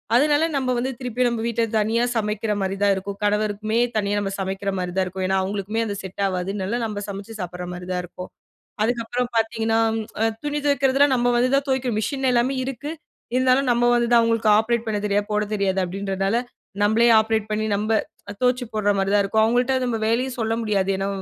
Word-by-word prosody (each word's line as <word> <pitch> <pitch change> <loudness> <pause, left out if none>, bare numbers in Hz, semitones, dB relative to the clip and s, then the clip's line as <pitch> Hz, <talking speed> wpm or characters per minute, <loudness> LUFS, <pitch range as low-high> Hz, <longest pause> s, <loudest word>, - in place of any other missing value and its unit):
அதனால 295 +4 +4
நம்ம 260 -2 0
வந்து 255 +2 -1
திருப்பியும் 250 -1 0
நம்ம 235 -1 -3
வீட்ல 235 0 0
தனியா 220 +2 +1
சமைக்கிறமாரி 210 -3 -1
தான் 200 - +4
இருக்கும். 195 +1 -5
கணவருக்குமே 210 +1 0 0.2
தனியா 205 -1 0
நம்ம 195 -1 -2
சமைக்கிறமாரி 190 -1 -2
தான் 190 - +2
இருக்கும். 185 +1 -5
ஏன்னா 190 0 +1
அவுங்களுக்குமே, 200 +3 -2
அது 205 - -3
செட் 190 +1 -7
ஆவாதுனால 195 +4 -2
நம்ம 210 -2 -4
சமைச்சு 200 +3 -7
சாப்புட்றமாரி 180 0 -6
தான் 180 0 -1
இருக்கும். 180 +1 -9 0.6
அதுக்கப்புறம் 240 +1 -1
பார்த்தீங்கன்னா, 225 0 +1 0.4
அ - - +4 0.2
துணி 295 0 -1
துவைக்கிறதெல்லாம் 280 -1 +3
நம்ம 245 0 +2
வந்து 250 +1 +2
தான் 280 +1 0
துவைக்கணும் 260 -4 0
மிஷின் 265 +5 -1
எல்லாமே 245 +3 +1
இருக்கு. 270 +3 -5 0.4
இருந்தாலும் 255 +1 +3
நம்ம 240 0 +1
வந்து 235 0 +1
தான் 235 - +7
அவுங்களுக்கு 230 -1 +2
ஆப்ரேட் 235 +1 0
பண்ணத் 210 -1 -1
தெரியாது, 205 0 0
போடத் 210 0 0
தெரியாது 195 -2 0
அப்பிடின்றதுனால 195 +2 -2 0.5
நம்மளே 220 +3 +4
ஆப்ரேட் 220 -1 -1
பண்ணி 215 +1 0
நம்ப 215 +2 -1 0.5
துவச்சு 250 0 +2
போட்றமாரி 200 -2 +1
தான் 205 - +5
இருக்கும். 220 +2 +2
வுங்கள்ட்ட 245 +3 +2
நம்ம 240 -2 -1
வேலையும் 250 +3 0
சொல்ல 225 0 0
முடியாது. 200 -3 0
ஏன்னா 195 - -1
220 Hz, 180 wpm, -23 LUFS, 200-240 Hz, 0.6 s, தான்